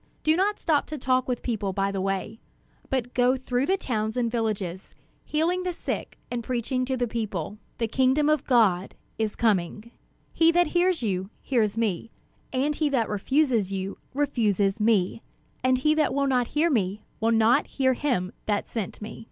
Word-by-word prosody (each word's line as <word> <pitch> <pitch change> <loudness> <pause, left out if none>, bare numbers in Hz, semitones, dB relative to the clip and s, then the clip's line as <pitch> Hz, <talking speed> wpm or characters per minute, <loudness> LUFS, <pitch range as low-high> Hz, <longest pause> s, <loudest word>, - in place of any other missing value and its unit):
Do 310 +1 +4
not 405 +4 +1
stop 300 -3 +1
to 305 - -5
talk 255 -1 +1
with 250 -2 -2
people 210 -5 -2
by 195 +1 0
the 195 -1 -2
way; 195 +3 -2 0.5
but 250 -2 -2
go 250 +1 +3
through 255 +1 -1
the 385 - +2
towns 220 - -2
and 235 -2 0
villages, 205 -6 -3 0.3
healing 335 +4 0
the 365 -1 -2
sick, - - -5
and 240 -1 -2
preaching 255 +2 -1
to 260 0 -1
the 245 -1 0
people, 210 -4 -4 0.2
'The 230 -1 -1
kingdom 265 +5 +3
of 305 -2 +2
God 205 -8 +2 0.2
is 220 -1 -1
coming,' 215 0 0 0.4
He 330 0 +5
that 350 +1 +4
hears 355 -4 +1
you, 190 -3 -1
hears 225 -5 0
me; 225 -2 -1 0.4
and 275 +3 0
he 305 -1 +1
that 250 -5 +1
refuses 230 -1 +1
you, 195 0 -4 0.2
refuses 215 -8 +1
me; 210 -1 +2 0.4
and 255 0 +3
he 300 +4 +3
that 305 -3 +1
will 280 0 +2
not 250 -3 +2
hear 330 +2 +3
me, 210 -4 0 0.2
will 225 - +2
not 230 +5 +4
hear 260 -1 +1
him 240 -9 -1
that 205 -1 0
sent 215 -2 -5
me." 210 - -8
240 Hz, 180 wpm, -26 LUFS, 210-275 Hz, 0.5 s, He